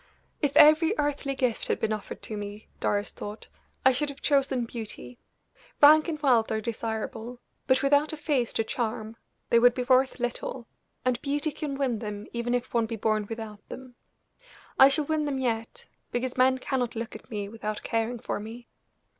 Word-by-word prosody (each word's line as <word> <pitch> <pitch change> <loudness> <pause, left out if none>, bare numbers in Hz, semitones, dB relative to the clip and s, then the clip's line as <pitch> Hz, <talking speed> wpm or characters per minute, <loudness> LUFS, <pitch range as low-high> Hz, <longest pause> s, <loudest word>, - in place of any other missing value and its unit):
"If 285 -2 +1
every 315 +6 +7
earthly 285 -1 -1
gift 250 -4 -1
had - - 0
been 220 -1 0
offered 210 -2 -7
to 215 - -5
me," 205 +1 -7
Doris 205 0 0
thought, 210 +1 -8 0.4
"I 265 - +8
should 290 +3 0
have 280 - -9
chosen 275 -4 +1
beauty. 215 - -8 0.6
Rank 305 +2 +7
and 315 -3 -3
wealth 240 -5 +3
are 220 - 0
desirable; 225 +1 -4 0.3
but 260 0 +3
without 285 +2 +3
a 315 - -5
face 285 -5 0
to 225 - +1
charm 220 -1 -3 0.4
they 235 - +6
would 245 0 +5
be 250 - -1
worth 260 +1 +3
little, 245 0 -4 0.4
and 250 -2 +1
beauty 290 +2 -1
can 295 -2 -4
win 255 -5 0
them 210 -1 -5
even 240 +1 -1
if 245 - -3
one 230 -2 +2
be 230 - -4
born 215 -1 0
without 220 -2 -8
them. 260 -1 -9 0.9
I 265 - +10
shall 290 +2 +1
win 310 0 0
them 285 -2 -1
yet, 230 -3 -2 0.3
because 245 +1 -2
men 260 +1 +4
cannot 255 -2 -2
look 230 0 -5
at 215 - -12
me 205 -2 -4
without 215 0 -5
caring 230 +2 -1
for 220 - -4
me." 230 +3 -9
245 Hz, 185 wpm, -27 LUFS, 220-275 Hz, 0.9 s, I